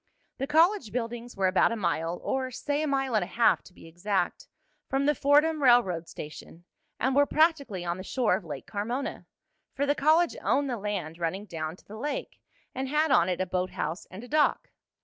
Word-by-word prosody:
The 270 - -2
college 320 - +3
buildings 240 0 -4
were 195 - +1
about 185 +4 +3
a - - -1
mile, 170 -4 -1
or, 260 -1 -1
say 285 +4 -2
a 310 - -1
mile 270 -2 0
and 215 -4 +3
a - - -5
half 235 -1 +3
to - - -14
be 180 - -16
exact, 195 - -2 0.4
from 270 +1 +1
the 295 - +4
Fordham 295 +3 +3
railroad 230 - +4
station, 155 +2 -10 0.4
and 260 +2 +1
were 285 0 +5
practically 280 - +1
on 170 +1 -2
the 185 - -7
shore 240 +2 +1
of - - -5
Lake 145 -5 -7
Carmona, 235 +6 -4 0.5
for 285 - 0
the 285 - +3
college 315 +4 +3
owned 280 -1 +1
the 240 - -2
land 190 -6 -4
running 185 +5 -2
down 160 -4 -5
to - - -23
the 215 - -10
lake, 285 +4 -4 0.3
and 260 0 -3
had 305 +1 +2
on 180 -9 +4
it 180 - -1
a 185 - +1
boathouse 185 -1 -3
and 190 +5 -10
a - - -9
dock. 300 +2 +1
235 Hz, 205 wpm, -28 LUFS, 185-280 Hz, 0.5 s, were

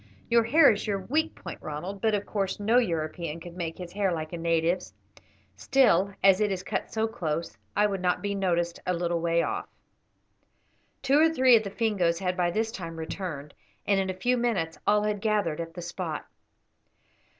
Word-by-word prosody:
"Your 235 -1 +5
hair 285 +4 +6
is 215 +1 -3
your 200 -2 0
weak 305 +12 -1
point, - - -9
Ronald; 175 +6 -6
but, 220 -1 +2
of 205 - -3
course, 195 -2 -2
no 225 +4 +4
European 165 -5 -2
could 170 +1 -10
make 170 -2 -4
his 180 -1 -8
hair 195 -1 +1
like 155 -1 -4
a - - -3
native's. 165 +2 0 0.6
Still, 200 -8 +3
as 195 0 +6
it 210 -1 +2
is 185 -1 -3
cut - - -3
so 220 0 0
close, 165 -7 -3 0.2
it 210 0 +5
would 195 -2 -3
not 180 -1 +1
be 200 0 -1
noticed 175 -3 0
a 180 - +1
little 170 -1 -1
way 170 0 +2
off." - - -3 1.4
Two 275 +2 +4
or 320 +1 +6
three 260 -6 +5
of 225 - +4
the 205 - -5
Fingoes 195 -6 +1
had 180 0 -1
by 175 -2 +1
this 220 +5 -1
time 165 -7 -7
returned, 160 -3 -5 0.3
and 200 -1 +3
in 190 0 -1
a 185 - -3
few 245 +7 +1
minutes 205 -10 -1
all 210 0 +4
had 210 -1 -1
gathered 205 -8 0
at 165 0 -8
the 175 - -6
spot. 170 -2 -4
190 Hz, 195 wpm, -27 LUFS, 170-215 Hz, 1.4 s, hair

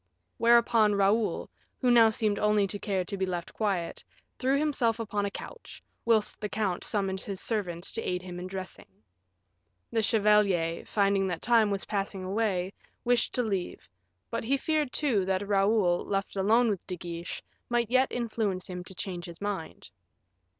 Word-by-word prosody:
Whereupon 230 -2 +5
Raoul, 205 +3 +2 0.3
who 250 -2 +3
now 230 -2 +7
seemed 215 -1 0
only 210 -1 +3
to 200 +1 -3
care 190 -3 -1
to 200 - -4
be 190 -1 -1
left 175 -2 -4
quiet, 195 -6 -2 0.4
threw 265 +2 +2
himself 265 -7 +1
upon 210 -2 -1
a - - -2
couch, 475 - -10 0.2
whilst 220 -2 +1
the 210 - -2
count 200 -4 -1
summoned 195 -3 -1
his 195 -2 -5
servants 185 -6 -2
to 225 - -2
aid 180 -3 -2
him 180 -1 -7
in 180 - -5
dressing. 185 0 -7 1.0
The 225 - +2
chevalier, 205 -6 +3
finding 200 -2 +2
that 175 -3 -4
time 230 -3 +4
was 200 -1 -2
passing 195 -2 -3
away, 190 -1 -1 0.3
wished 245 -1 +2
to 250 - +1
leave; 195 - -3 0.4
but - - -2
he 270 +5 +1
feared, 300 -1 0
too, 245 -10 +1
that 190 +1 -1
Raoul, 195 -3 +3
left 195 0 -2
alone 220 +4 +3
with 195 - -5
De 180 - -4
Guiche, 170 0 -6 0.3
might 240 -1 0
yet 260 +1 +3
influence 220 -6 -2
him 180 -1 -6
to 190 - -9
change 175 -2 -5
his 170 -2 -10
mind. 200 - -5
205 Hz, 170 wpm, -29 LUFS, 185-225 Hz, 1.0 s, now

